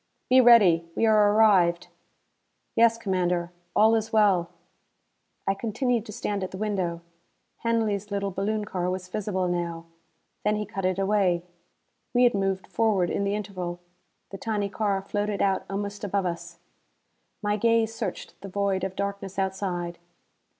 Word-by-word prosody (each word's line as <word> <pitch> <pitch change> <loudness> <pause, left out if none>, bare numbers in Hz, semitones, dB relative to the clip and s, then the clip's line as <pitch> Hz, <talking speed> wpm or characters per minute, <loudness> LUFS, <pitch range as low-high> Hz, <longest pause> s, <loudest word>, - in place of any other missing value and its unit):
"Be 260 0 +8
ready. 190 -9 +6
We - - +2
are 210 -2 +5
arrived." 190 -6 +4 0.9
"Yes, 230 0 +5
Commander. 180 -5 -1 0.2
All 220 +1 +5
is 225 0 0
well." 200 -6 +3 1.0
I 195 - +2
continued 230 +2 -1
to - - -7
stand 205 -3 -3
at 185 - -3
the 185 - -8
window. 190 -5 -2 0.6
Hanley's 220 -3 0
little 200 -1 -2
balloon 210 +3 -2
car 180 -3 -2
was 185 0 -4
visible 190 -1 -2
now. 170 -1 -3 0.6
Then 210 0 +2
he 210 0 -2
cut 195 -1 -4
it 185 0 +1
away. 195 -3 +2 0.7
We 245 - +5
had 245 - +5
moved 195 -1 -1
forward 210 -6 +1
in 200 - -1
the 200 +1 0
interval. 185 -4 -5 0.5
The 195 - -7
tiny 210 -3 -1
car 200 -2 -1
floated 205 0 -2
out 195 -1 +1
almost 200 +1 -4
above 200 -1 -1
us. 170 0 -5 0.9
My 205 0 +1
gaze 225 +1 +2
searched 215 -5 -6
the 195 - -8
void 195 -1 -1
of 190 -1 -3
darkness 200 -1 -4
outside. 190 -3 -2
200 Hz, 150 wpm, -26 LUFS, 185-215 Hz, 1.0 s, Be